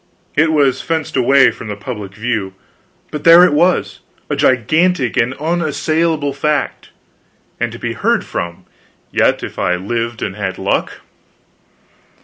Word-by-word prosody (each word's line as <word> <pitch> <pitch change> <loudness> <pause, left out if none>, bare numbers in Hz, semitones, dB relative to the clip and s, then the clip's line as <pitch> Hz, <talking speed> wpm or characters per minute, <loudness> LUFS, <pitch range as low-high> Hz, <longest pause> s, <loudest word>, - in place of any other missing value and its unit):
It 155 +2 +3
was 140 -4 +2
fenced 160 -2 -3
away 135 +1 +5
from 115 - -10
the 105 - -4
public 100 -2 -7
view, 105 -4 -3 0.6
but 150 - -5
there 170 +1 +8
it 180 - +2
was, 175 +4 +1 0.3
a - - +1
gigantic 140 - +2
and 125 +3 +1
unassailable 155 -1 -1
fact 150 +1 -2 0.7
and - - -1
to - - -8
be - - -4
heard - - 0
from, 85 +1 -5 0.5
yet, - - +2
if - - -7
I 90 - +1
lived 115 +5 -3
and 95 - -4
had 95 -3 -4
luck. 95 - -2
135 Hz, 140 wpm, -16 LUFS, 105-155 Hz, 0.7 s, there